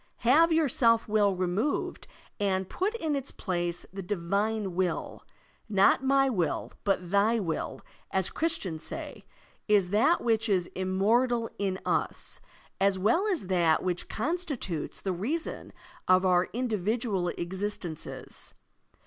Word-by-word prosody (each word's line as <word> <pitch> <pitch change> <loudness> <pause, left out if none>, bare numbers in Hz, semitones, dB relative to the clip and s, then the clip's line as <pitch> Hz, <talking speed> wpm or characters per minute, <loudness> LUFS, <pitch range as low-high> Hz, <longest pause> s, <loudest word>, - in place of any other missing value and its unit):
Have 325 +7 +6
your 320 -2 +3
self 230 -2 +3
will 205 -2 +3
removed 185 +10 -1 0.3
and 190 -2 0
put 400 - -1
in 315 -9 -1
its 275 -1 -3
place 175 -2 -3
the 195 - -5
divine 200 +2 -1
will. 180 -1 -2 0.5
"Not 200 +5 +4
my 270 0 +4
will, 185 -10 -1
but 185 -3 0
thy 215 +3 +3
will," 165 -6 -3 0.3
as 190 -1 0
Christians 195 - -1
say, - - -6 0.4
is 200 -4 +3
that 230 +12 +3
which 225 -1 +1
is 185 -3 +2
immortal 225 +6 +1
in 195 -2 0
us, - - -1 0.4
as 195 0 +3
well 230 - +2
as 365 - -1
that 175 -4 +2
which 180 -1 -2
constitutes 275 - -2
the 190 - -1
reason 265 - -3 0.4
of 185 +1 +5
our 180 -1 +3
individual 220 -4 -1
existences. 175 -1 -5
200 Hz, 130 wpm, -28 LUFS, 185-240 Hz, 0.5 s, Have